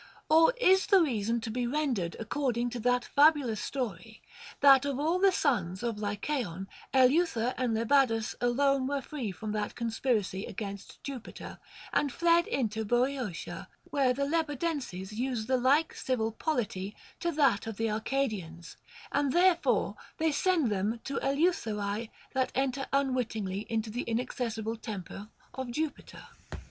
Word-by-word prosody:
Or 325 +10 +6
is 380 -4 +4
the 395 -2 +6
reason 230 -4 0
to 225 -1 -4
be 245 +1 -1
ren 295 +1 0
dered 175 -6 -3
according 245 0 -1
to 245 - -4
that 245 +1 +1
fabulous 285 -7 +3
story, 225 -4 -5 0.4
that 275 -2 +7
of 280 -1 -2
all 325 +5 +1
the 390 0 +5
sons 195 - 0
of 230 -3 -2
Lycaon 205 - -3 0.2
Eleuther 260 -2 +3
and 245 -3 0
Lebadus 230 -1 +2
alone 265 +2 +2
were 280 -1 -2
free 255 -9 -4
from 215 +3 -6
that 210 -1 -3
conspiracy 225 -4 -1
against 200 -1 -7
Jupiter, 260 -5 -8 0.3
and 285 - +2
fled 340 +3 +3
into 220 -4 -1
Boeotia, 245 -3 -1 0.2
where 270 -3 +3
the 280 +3 0
Lebadenses 290 - -2
use 240 -1 -2
the 260 +2 +2
like 280 +6 +3
civil 225 -4 -1
polity 215 - -2 0.2
to 340 - 0
that 275 -9 +2
of 220 -3 -5
the 225 -1 0
Arcadians, 210 -8 -3 0.3
and 285 -1 +1
therefore 350 +2 +3 0.2
they 320 -1 +2
send 315 - +2
them 205 +4 -1
to 275 - -4
Eleutherae 225 - 0 0.2
that 260 -1 0
enter 270 0 0
unwittingly 235 -8 -1
into 220 -1 -1
the 245 +3 -2
inaccessible 230 -1 -2
temple 205 -2 -7 0.3
of 260 -1 -5
Ju 305 +5 -1
piter? - - -14
245 Hz, 145 wpm, -30 LUFS, 220-280 Hz, 0.4 s, that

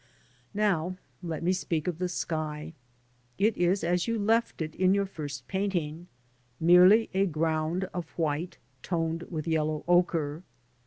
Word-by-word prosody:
Now 185 -4 +1 0.2
let 165 -3 -4
me 180 +2 +2
speak 170 -4 -2
of 175 -2 -2
the 180 -1 -1
sky. 155 -2 -3 0.6
It 215 +2 +2
is 180 +3 +1
as 175 +3 +1
you 230 0 0
left 225 +3 +1
it 160 -1 -3
in 185 +1 +3
your 200 0 +1
first 145 -8 -7
painting 175 -4 -2 0.3
— 125 -1 -39
merely 180 +6 +6
a 195 +1 +2
ground 160 +2 0
of 175 -3 -4
white, 160 +1 -1 0.2
toned 165 0 -1
with 160 -2 -4
yellow 155 -1 0
ochre. 170 -3 +2
170 Hz, 150 wpm, -28 LUFS, 155-185 Hz, 0.6 s, merely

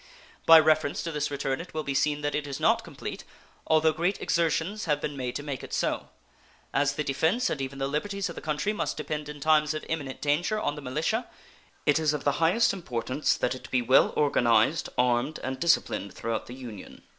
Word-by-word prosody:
By 165 0 +10
reference 155 -2 +2
to 165 - -3
this 150 -1 -1
return 135 -1 -2
it 170 - -12
will 155 - -1
be 140 - -2
seen 150 +2 +1
that 145 0 -1
it 150 -1 -2
is 140 - -5
not - - +3
complete, - - -7 0.4
although 160 0 +4
great 175 +5 0
exertions 170 +5 0
have 150 -3 +1
been 145 0 -4
made 125 -2 -4
to 145 - -4
make 140 -3 -5
it - - -9
so. - - -1 0.6
As 145 +1 +2
the 150 - -2
defense 160 - +1
and 140 - -2
even 135 +1 -5
the 135 0 -1
liberties 195 +7 -2
of 170 - -6
the - - -8
country 155 +7 -1
must 210 - -2
depend 150 -1 -4
in 150 0 -8
times 155 +1 +3
of 155 - -5
imminent 145 -5 -4
danger 170 +9 +1
on 145 - -1
the 150 - -8
militia, 155 - -1 0.6
it 145 0 +4
is 155 -2 +2
of - - -5
the 145 +2 0
highest 195 +9 +4
importance 130 -5 -1
that 125 - 0
it 130 - -9
be 125 -1 +1
well 130 +3 +5
organized, 125 0 +3
armed, 125 +4 +1
and 130 0 -3
disciplined 165 - +1
throughout 115 -1 -3
the 125 - -8
Union. 120 -6 -10
150 Hz, 215 wpm, -27 LUFS, 135-160 Hz, 0.6 s, By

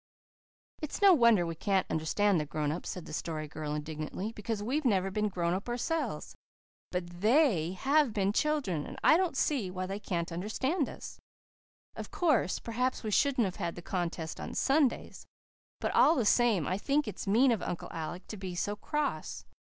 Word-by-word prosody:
"It's 305 - -4
no 395 -2 +7
wonder 235 - +5
we 165 - -3
can't 190 +3 0
understand 180 +4 +2
the 150 - -2
grown 150 0 -1
ups," 170 - -5
said 180 - -6
the - - -9
Story 155 -1 -3
Girl 150 0 -4
indignantly, 155 +7 -4
"because 210 -1 -4
we've 275 +8 -1
never 195 -6 +2
been 210 +1 0
grown 175 -2 -1
up 195 +6 -3
ourselves. 250 +7 -2 0.6
But 175 -1 -5
THEY 215 - +3
have 275 +5 +2
been 200 -1 0
children, 240 - 0
and - - -8
I - - +7
don't 345 -5 +1
see 260 -12 +1
why 185 0 -4
they 195 +2 -4
can't 175 -4 -3
understand 255 - -1
us. - - -9 0.8
Of - - -6
course, 295 - +1
perhaps 250 +3 -2
we 215 - -2
shouldn't 260 0 +3
have 185 0 -4
had 170 -4 -3
the 175 - -9
contest 170 -3 -3
on - - -6
Sundays. 275 -2 +1 0.5
But - - -1
all 330 - +5
the 245 - +1
same 220 - +3
I 185 +5 -1
think 285 +3 +1
it's 205 - -6
mean 240 +6 +5
of 225 - 0
Uncle 175 - -4
Alec 165 +3 -5
to 215 - -6
be 185 -2 -6
so 205 +4 -1
cross. 275 - -3
205 Hz, 185 wpm, -31 LUFS, 175-255 Hz, 0.8 s, no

